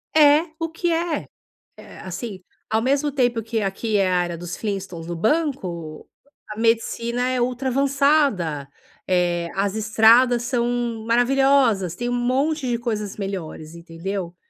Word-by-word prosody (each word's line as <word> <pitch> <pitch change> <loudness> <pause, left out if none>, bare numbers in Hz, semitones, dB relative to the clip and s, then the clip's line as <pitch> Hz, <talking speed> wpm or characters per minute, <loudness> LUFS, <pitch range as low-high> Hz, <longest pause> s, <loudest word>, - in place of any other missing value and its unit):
É 300 +1 +6
o 330 0 -2
que 340 +2 -2
é. 330 -1 -1 0.5
É, - - -13
assim, 190 0 -7 0.3
ao 220 +1 +1
mesmo 280 +4 +1
tempo 245 -4 +1
que 225 0 -2
aqui 205 +2 -1
é 195 -2 +2
a 180 -1 +2
era 175 -1 -5
dos 175 +1 -6
Flintstones 190 -6 -5
no 175 - -4
banco, 185 - -2 0.4
a 210 - -7
medicina 235 +2 0
é 255 -1 0
ultra 250 +2 -1
avançada, 275 - +1 0.4
eh, 175 -2 +1
as 195 +1 0
estradas 230 +3 +4
são 240 -2 -1
maravilhosas, 245 -6 +3
tem 240 +5 -3
um - - -1
monte 260 +4 0
de 240 - 0
coisas 215 -4 -4
melhores, 170 -5 -6
entendeu. 170 +2 -6
230 Hz, 145 wpm, -22 LUFS, 185-260 Hz, 0.5 s, É